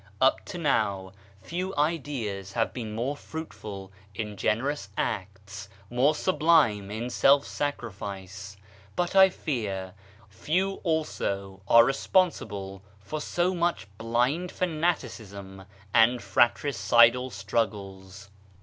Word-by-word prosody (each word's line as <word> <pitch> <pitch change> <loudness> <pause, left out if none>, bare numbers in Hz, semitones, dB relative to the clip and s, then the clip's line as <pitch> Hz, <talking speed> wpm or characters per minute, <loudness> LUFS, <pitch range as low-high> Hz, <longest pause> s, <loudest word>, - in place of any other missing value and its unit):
Up - - +3
to - - -7
now, 95 -1 0 0.3
few 185 +3 -4
ideas 135 - -2
have 115 +1 0
been 110 -4 -5
more 125 +6 -2
fruitful 105 -12 -8 0.2
in 105 0 -4
generous 120 +3 -1
acts, 100 0 -4 0.2
more 135 +5 +3
sublime 150 - +3
in 115 +4 -4
self 140 +3 +4
sacrifice; 100 -7 -5 0.4
but, 175 +1 -1
I 190 0 +8
fear, 100 - -4 0.3
few 180 - -1
also 100 - -2
are 115 +2 +7
responsible 110 - 0 0.2
for 150 +10 -5
so 175 +4 0
much 175 -1 0
blind 125 +10 0
fanaticism 115 - -3 0.3
and 120 +2 +5
fratricidal 120 -1 +3
struggles. 100 -4 -4
115 Hz, 105 wpm, -27 LUFS, 100-150 Hz, 0.4 s, I